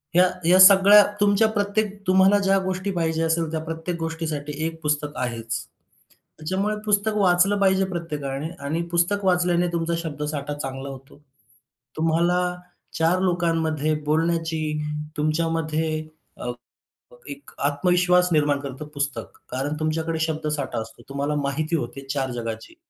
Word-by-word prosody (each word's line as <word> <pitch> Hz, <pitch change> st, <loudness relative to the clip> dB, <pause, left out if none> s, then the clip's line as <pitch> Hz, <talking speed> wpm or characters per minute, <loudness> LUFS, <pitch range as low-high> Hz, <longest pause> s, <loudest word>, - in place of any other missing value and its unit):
ह्या 180 Hz, +1 st, +6 dB, 0.2 s
ह्या 180 Hz, +2 st, +5 dB
सगळ्या, 200 Hz, +2 st, +9 dB, 0.2 s
तुमच्या 205 Hz, +2 st, +4 dB
प्रत्येक 205 Hz, 0 st, 0 dB, 0.2 s
तुम्हाला 190 Hz, +2 st, +5 dB
ज्या 195 Hz, -, +4 dB
गोष्टी 185 Hz, +1 st, -2 dB
पाहिजे 165 Hz, -2 st, -1 dB
असेल, 165 Hz, 0 st, 0 dB
त्या 160 Hz, -, -1 dB
प्रत्येक 165 Hz, +2 st, -4 dB
गोष्टीसाठी 160 Hz, -3 st, -4 dB
एक 165 Hz, 0 st, -5 dB
पुस्तक 150 Hz, 0 st, -1 dB
आहेच. 115 Hz, -2 st, -3 dB, 0.8 s
त्याच्यामुळे 190 Hz, +7 st, -1 dB
पुस्तक 210 Hz, +1 st, +2 dB
वाचलं 195 Hz, +1 st, +3 dB
पाहिजे 190 Hz, 0 st, +3 dB
प्रत्येकाने 150 Hz, -3 st, -4 dB, 0.2 s
आणि 160 Hz, +4 st, -1 dB
पुस्तक 175 Hz, +4 st, +1 dB
वाचल्याने 180 Hz, -1 st, +2 dB
तुमचा 170 Hz, 0 st, -1 dB
शब्दसाठा 150 Hz, -2 st, -4 dB
चांगला 135 Hz, -1 st, -6 dB
होतो. 135 Hz, 0 st, -11 dB, 0.8 s
तुम्हाला 165 Hz, +2 st, +2 dB, 0.6 s
चार 165 Hz, +3 st, +3 dB
लोकांमध्ये 165 Hz, -4 st, 0 dB
बोलण्याची 160 Hz, +1 st, 0 dB, 0.6 s
तुमच्यामध्ये 155 Hz, 0 st, -1 dB, 0.4 s
अ, 125 Hz, -, -1 dB, 0.8 s
एक 140 Hz, 0 st, -10 dB
आत्मविश्वास 180 Hz, +5 st, +2 dB
निर्माण 145 Hz, -2 st, +2 dB
करतं 140 Hz, +1 st, -7 dB
पुस्तक. 145 Hz, 0 st, -4 dB
कारण 135 Hz, +4 st, -2 dB
तुमच्याकडे 160 Hz, +1 st, -1 dB
शब्दसाठा 150 Hz, -5 st, -2 dB
असतो, 110 Hz, -, -11 dB
तुम्हाला 140 Hz, +2 st, -2 dB
माहिती 155 Hz, +4 st, -1 dB
होते 135 Hz, -2 st, -6 dB
चार 135 Hz, -2 st, -1 dB
जगाची. 115 Hz, -, -6 dB
160 Hz, 125 wpm, -23 LUFS, 145-180 Hz, 0.8 s, सगळ्या